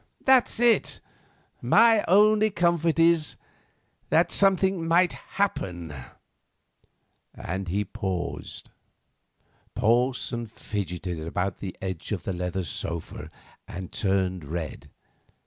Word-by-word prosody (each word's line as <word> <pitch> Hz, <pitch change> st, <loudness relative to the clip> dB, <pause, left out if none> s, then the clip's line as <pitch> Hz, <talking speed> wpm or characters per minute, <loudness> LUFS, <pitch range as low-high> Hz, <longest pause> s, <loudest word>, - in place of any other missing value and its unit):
That's 260 Hz, -4 st, +4 dB
it. 240 Hz, -1 st, +3 dB, 0.6 s
My 225 Hz, -2 st, +5 dB
only 215 Hz, +3 st, +5 dB
comfort 170 Hz, -4 st, +1 dB
is—that 165 Hz, -2 st, -1 dB
something 190 Hz, -2 st, +3 dB
might 175 Hz, +2 st, +3 dB
happen," 90 Hz, -, -3 dB, 1.4 s
and 95 Hz, +2 st, -5 dB
he 100 Hz, +4 st, -1 dB
paused. 95 Hz, -2 st, -5 dB, 1.1 s
Porson 120 Hz, +1 st, 0 dB
fidgeted 90 Hz, -5 st, -5 dB
about 90 Hz, +4 st, -2 dB
on -, -, -33 dB
the 95 Hz, -2 st, -7 dB
edge 95 Hz, -4 st, -5 dB
of -, -, -2 dB
the 95 Hz, -, -3 dB
leather 90 Hz, +1 st, -3 dB
sofa 85 Hz, +1 st, -6 dB, 0.4 s
and 90 Hz, +1 st, -7 dB
turned 95 Hz, -3 st, 0 dB
red. 80 Hz, +1 st, -6 dB
105 Hz, 95 wpm, -26 LUFS, -, 1.4 s, My